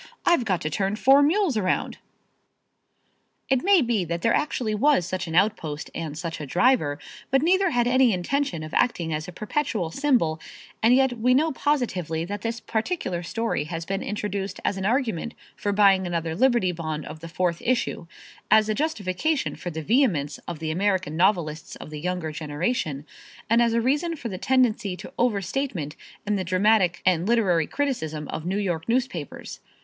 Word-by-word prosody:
"I've 340 -9 +3
got 185 -5 0
to 155 - -2
turn 195 +4 0
four 270 +5 +5
mules 320 - +2
around." 185 -3 -1 1.5
It 265 -2 +3
may 390 -5 +5
be 230 -5 +1
that 170 +1 -4
there 230 - +3
actually 245 -7 0
was 250 - +3
such 185 0 -3
an 160 - -4
outpost 170 -6 0
and 155 -3 -5
such 170 -1 -5
a 150 - -6
driver, 175 - +2 0.3
but 270 +1 +2
neither 375 +3 +3
had 240 -4 +1
any 255 0 +4
intention 205 - -1
of 155 - -8
acting 170 -10 +1
as 155 +2 -3
a - - -7
perpetual 215 - -2
symbol 240 - +1 0.4
and 235 +3 +5
yet 260 -3 +2
we 250 +3 +3
know 315 +4 +3
positively 190 - -1
that 205 +2 -5
this 230 +1 -3
particular 220 - -2
story 225 -2 -2
has 165 +1 -5
been 195 +2 -2
introduced 200 -1 -4
as - - +1
an 190 0 -2
argument 235 - -1 0.2
for 205 - -2
buying 195 -2 +4
another 165 -2 -2
Liberty 240 -4 +3
Bond 155 -3 -4
of 155 - -8
the 165 +1 -9
fourth 170 0 -1
issue; 235 -8 -1 0.4
as 215 0 +5
a - - +2
justification 280 - -1
for 175 - -6
the 160 -1 -5
vehemence 185 - +1
of 175 - -4
the 160 0 -3
American 185 -3 0
novelists 170 -4 0
of - - -10
the 150 - -6
younger 180 -1 -3
generation; 150 - -2 0.5
and 230 +1 +5
as 235 -1 +3
a 230 - +2
reason 295 +7 0
for 245 -6 -6
the 185 -3 -6
tendency 235 -7 +1
to 265 - -10
overstatement 205 - -1 0.3
in 210 0 0
the 190 - -2
dramatic 185 0 +2
and 180 0 +2
literary 190 -9 +2
criticism 160 - -2
of 160 - -5
New 190 +2 0
York 180 -3 -2
newspapers. 230 - -2
200 Hz, 180 wpm, -25 LUFS, 170-245 Hz, 1.5 s, four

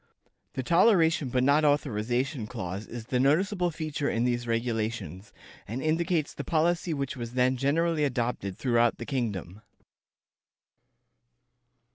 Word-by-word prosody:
The 130 - -3
"toleration 165 - +4
but 125 +1 +1
not 145 +3 +4
authorization" 130 -3 0
clause 95 +1 -5
is 115 -2 -7
the 125 +1 -1
noticeable 180 +7 +2
feature 155 -3 -3
in 115 - 0
these 120 -1 -1
regulations, 115 -5 -2 0.4
and 115 +5 -4
indicates 160 +1 0
the - - -6
policy 170 +1 +1
which 140 -3 -2
was 120 -2 -6
then 130 +1 +2
generally 155 +4 +1
adopted 120 -8 -2
throughout 120 -2 +2
the 120 - -6
kingdom. 105 - -3
130 Hz, 125 wpm, -28 LUFS, 115-155 Hz, 0.4 s, toleration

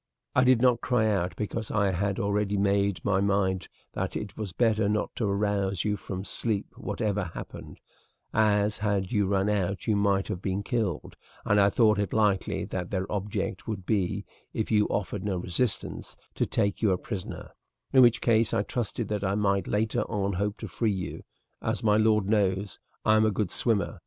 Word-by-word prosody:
"I 125 - +5
did 125 -1 +4
not 125 -2 +4
cry 115 -3 +2
out, 90 -3 -1
because 110 +1 -3
I 100 -2 +2
had 100 +2 -1
already 100 0 0
made 100 0 +2
up - - -20
my 100 -1 +2
mind 100 -2 +1 0.3
that - - -3
it 105 -2 -5
was 105 -4 -5
better 110 0 +2
not 105 0 -1
to 110 - 0
arouse 100 -2 0
you 105 -1 0
from 95 -2 -6
sleep 105 -3 -2
whatever 105 -2 -2
happened, 85 - -9 0.5
as, 105 -1 +2
had 100 -3 0
you 105 -4 +2
run 95 0 +1
out, 100 -2 -1
you 110 - +2
might 100 -1 +2
have 90 - -4
been 95 +1 -2
killed, 105 - -2 0.3
and 105 0 +4
I 100 - +5
thought 105 -1 +3
it 100 -3 -1
likely 105 -3 +1
that 90 -1 -4
their 95 -2 -1
object 100 -1 -3
would 100 -5 -4
be, 100 0 0 0.3
if 110 - -2
you 105 -1 +4
offered 100 0 -2
no 100 -3 -1
resistance, 90 +6 -2 0.2
to - - 0
take 100 0 0
you 110 - +3
a 90 - +2
prisoner, 95 -1 -6 0.4
in 130 - +7
which 120 -1 +5
case 115 -1 +3
I 100 - +2
trusted 115 +1 -3
that 105 -1 -2
I 100 0 +1
might 100 -3 +1
later 110 +1 0
on 100 -2 -1
hope 100 +3 -1
to 110 - -4
free 110 +4 -1
you. 95 -2 -5 0.4
As - - -1
my 105 -1 +4
lord 110 -2 +3
knows, 100 -3 0 0.3
I 110 0 +5
am 110 - +4
a 110 - +4
good 100 -3 -1
swimmer. 110 -4 0
100 Hz, 195 wpm, -28 LUFS, 95-110 Hz, 0.5 s, in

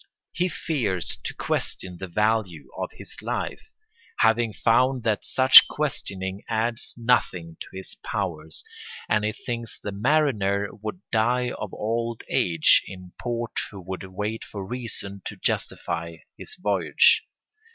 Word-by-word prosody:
He 180 +1 0
fears 115 - -2
to - - -3
question 90 -2 -2
the 95 - -5
value 105 -3 0
of - - -3
his - - -6
life, 440 - -4 0.5
having 115 0 +4
found 125 +4 +2
that 110 -2 +1
such 130 0 +9
questioning 100 -10 -3
adds 115 +1 -1
nothing 90 -9 +1
to - - -7
his 95 0 -6
powers; 75 +1 -3 0.4
and 105 0 +2
he 105 - +1
thinks 120 -1 -6
the 105 - -5
mariner 100 -4 +2
would 110 - -7
die 120 +2 +2
of 105 - -6
old 115 +1 -2
age 80 -3 +5
in 90 -1 -10
port 120 -1 -2 0.2
who 95 -4 -10
should 95 0 -5
wait 105 +4 -3
for 100 -2 -7
reason 100 -4 -5
to - - -4
justify 85 0 -2 0.2
his 430 - -8
voyage. - - +4
110 Hz, 135 wpm, -25 LUFS, 95-120 Hz, 0.5 s, such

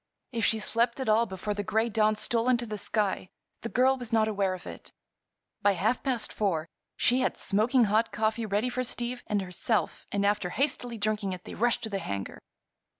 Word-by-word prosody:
If 230 -2 -2
she 225 - +3
slept 235 +3 0
at 265 - -3
all 225 +2 +4
before 190 +2 -3
the 205 - -3
gray 220 +3 +1
dawn 215 -1 +2
stole 230 +3 0
into 240 -1 +2
the 215 -2 -5
sky 200 -4 -1 0.3
the 230 - -4
girl 260 +3 +3
was 245 -2 -5
not 220 -1 +3
aware 195 -3 0
of 180 - -12
it. - - -9 0.7
By 205 - +4
half 205 +7 0
past 250 -5 -1
four 170 -7 0 0.3
she 250 +2 +3
had 255 - 0
smoking 235 +5 +3
hot 220 +2 +2
coffee 220 +1 0
ready 210 +4 +1
for 255 +1 -2
Steve 245 0 -2
and 205 -2 0
herself 190 +5 -1
and 200 0 +1
after 205 -3 +1
hastily 250 0 -1
drinking 210 -2 -1
it 180 -1 -8
they - - -8
rushed 240 +2 +1
to 220 - -3
the 195 - -1
hangar. 100 - -5
215 Hz, 205 wpm, -28 LUFS, 205-235 Hz, 0.7 s, all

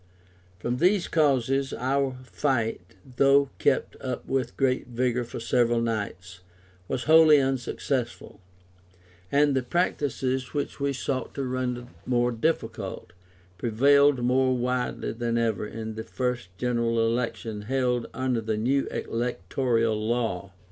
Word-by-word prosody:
From 120 +7 -2
these 180 +5 +3
causes 135 -3 +1
our 135 +1 0
fight, 125 -5 -1 0.4
though 140 0 +4
kept - - +1
up 130 -2 -4
with 130 -3 -2
great 130 -2 +1
vigour 125 0 0
for 120 - -7
several 120 0 +2
nights, 100 -5 -3 0.5
was 120 - -2
wholly 155 +1 +7
unsuccessful, 130 -1 -2 0.9
and 145 0 +3
the 130 - +2
practices 130 -3 -1
which 145 - -3
we 140 0 0
sought 130 -1 -3
to 140 - -2
render 125 -1 -2 0.2
more 120 -1 +2
difficult, 110 - -3 0.5
prevailed 140 +4 +4
more 130 +1 +2
widely 125 0 -1
than 115 0 -2
ever 110 -3 0
in 110 0 -6
the 110 +1 -5
first 125 -3 -3
General 115 -1 +1
Election 115 -2 -2
held 125 +1 0
under 130 -3 -1
the 110 -1 -2
new 135 +6 +1
electoral 115 0 -1
law. 110 -6 -1
125 Hz, 125 wpm, -26 LUFS, 115-135 Hz, 0.9 s, wholly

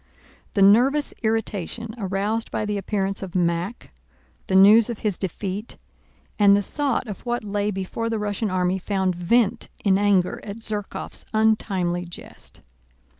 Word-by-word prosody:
The 200 - +4
nervous 255 +9 +4
irritation 220 0 -2
aroused 205 +3 -1
by - - -2
the 210 -1 -2
appearance 195 0 -2
of 190 -2 -7
Mack, 175 +5 -1 0.6
the 190 - 0
news 210 +4 +7
of 235 - -3
his 205 -3 +1
defeat, 195 +3 -5 0.6
and 200 -1 +7
the 205 - +1
thought 280 +1 -1
of 210 -4 -8
what 240 -1 -2
lay 205 0 -1
before 205 +4 -3
the 225 - -1
Russian 210 +1 -2
army 185 0 0
found 190 -1 0
vent 220 +6 +1 0.2
in 195 -1 +4
anger 200 -3 +2
at 200 - -6
Zherkóv's 215 -3 -5
untimely 195 -5 +1
jest. 175 - -10
205 Hz, 145 wpm, -23 LUFS, 190-220 Hz, 0.6 s, news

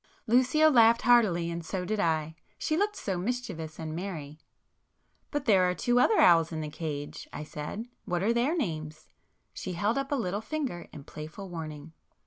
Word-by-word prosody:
Lucio 255 +6 +4
laughed 235 -2 +5
heartily, 195 -9 +4
and 170 0 -4
so 180 +2 -3
did 215 +2 -1
I,—she 160 - -2
looked 410 +4 +1
so 190 - -3
mischievous 190 -8 -4
and 160 -1 -5
merry. 160 -5 -6 0.9
"But 290 -2 -3
there 185 -4 +5
are 180 - -1
two 240 +7 +2
other 425 - +4
owls 165 -2 +6
in 160 -1 -3
the 155 - -4
cage"—I 150 -1 -6
said—"What 175 +4 -5
are 225 +3 +3
their 255 +9 +1
names?" 155 - -4 0.4
She 185 - -5
held 205 +8 0
up 275 +1 -4
a - - +3
little 205 -5 -2
finger 255 - -4
in 145 - -10
playful 155 +7 -8
warning. 160 -2 -7
180 Hz, 165 wpm, -29 LUFS, 160-240 Hz, 0.9 s, owls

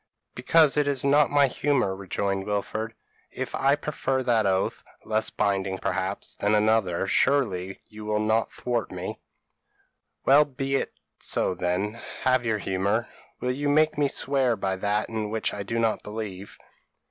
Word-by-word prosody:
p> - - -7
"'Because 155 -3 +5
it 145 -1 +3
is 140 0 0
not 145 +1 +5
my 145 -1 +5
humour,' 135 -7 0
rejoined 95 0 -2
Wilfred; 110 +2 -2 0.4
'if - - -5
I 140 +1 +3
prefer 135 -3 -2
that 115 -4 +2
oath, 95 0 0 0.2
less 110 0 0
binding 95 -2 0
perhaps, 95 +1 -2
than 105 +1 +1
another, 105 -4 +2
surely 95 -6 +1
you 105 0 -10
will 105 0 0
not 110 +1 +1
thwart 120 -2 -2
me.' - - -5 1.1
"'Well 140 +3 +7
be 135 -1 -2
it - - -3 0.3
so - - 0
then; 90 +6 -2 0.2
have 130 -2 +2
your 110 -1 +1
humour. 100 +4 -1 0.3
Will 125 - 0
you 145 +3 -1
make 155 +2 +3
me 145 -1 +2
swear 135 -3 +1
by 95 -2 -1
that 105 +2 0
in 110 -2 -3
which 110 +1 -1
I 105 - -4
do 115 +4 -3
not 115 -1 +1
believe?' 105 -2 -7
110 Hz, 160 wpm, -26 LUFS, 100-135 Hz, 1.1 s, Well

